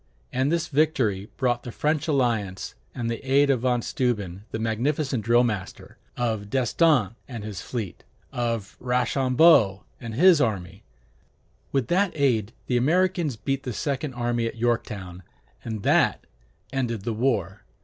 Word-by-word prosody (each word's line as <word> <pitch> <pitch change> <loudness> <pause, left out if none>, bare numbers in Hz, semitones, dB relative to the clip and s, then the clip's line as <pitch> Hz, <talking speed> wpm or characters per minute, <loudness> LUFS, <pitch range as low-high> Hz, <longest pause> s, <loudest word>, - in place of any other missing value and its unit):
And 130 +3 +1
this 170 0 0
victory 130 -10 +1
brought 120 -2 +1
the 120 - -7
French 150 +4 0
alliance, 115 - 0 0.2
and 120 -2 -3
the 115 +2 -3
aid 140 +1 +4
of 130 - +1
Von 125 -1 +1
Steuben 105 -6 -2
the - - -4
magnificent 120 +3 -1
drill 120 +2 +4
master, 105 -6 -4 0.2
of 110 -4 -2
d'Estaing 130 - +2
and 115 -5 -7
his 105 -4 -6
fleet, 110 -6 -5 0.3
of 115 -4 -2
Rochambeau 125 - +3 0.2
and 115 -2 -6
his 170 +2 +6
army. 100 -4 -2 0.9
With 135 -3 +1
that 190 +1 +2
aid, 120 -8 +1
the 125 - +1
Americans 170 +1 +2
beat 135 +5 -2
the 125 -3 -5
second 140 +1 -3
army 120 -1 0
at - - -5
Yorktown, 105 -6 -2 0.4
and 110 -3 -5
that - - +2 0.5
ended 120 -6 -2
the 115 - -2
war. 105 -5 -1
120 Hz, 145 wpm, -25 LUFS, 110-135 Hz, 0.9 s, his